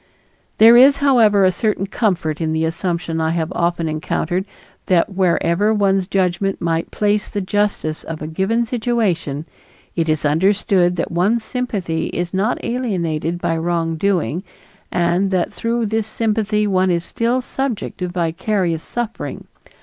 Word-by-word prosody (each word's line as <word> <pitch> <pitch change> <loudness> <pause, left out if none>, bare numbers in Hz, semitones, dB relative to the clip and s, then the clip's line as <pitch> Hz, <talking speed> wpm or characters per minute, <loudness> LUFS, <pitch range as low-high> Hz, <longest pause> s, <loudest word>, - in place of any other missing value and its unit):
There 225 +2 +8
is, 270 +3 +7
however, 230 -8 +4
a 185 - +5
certain 200 +1 -1
comfort 180 -7 -1
in 160 -1 0
the 160 0 +1
assumption 170 -1 -2
I 160 - +1
have 165 0 -1
often 170 -2 0
encountered 160 +4 -2 0.4
that 185 +2 +2
wherever 190 +3 +2
one's 195 -2 +2
judgment 195 0 0
might 165 -1 -1
place 210 0 0
the 205 - -3
justice 200 -5 -1
of 165 -1 -6
a 155 - -5
given 195 +9 0
situation, 215 - -1 0.5
it 165 -2 0
is 155 0 0
understood 180 +3 +2
that 165 - -3
one's 200 +7 +1
sympathy 200 -11 -2
is 175 +1 -3
not 200 +6 +1
alienated 175 - -2
by 165 - 0
wrongdoing, 165 - 0 0.5
and 175 +2 +1
that 185 -2 0
through 230 0 -1
this 220 0 -1
sympathy 215 -1 0
one 190 -2 +2
is 170 -1 +1
still 235 +7 0
subject 255 -2 -3
to 180 - -2
vicarious 175 0 -1
suffering. 235 +3 -5
185 Hz, 145 wpm, -19 LUFS, 170-215 Hz, 0.5 s, There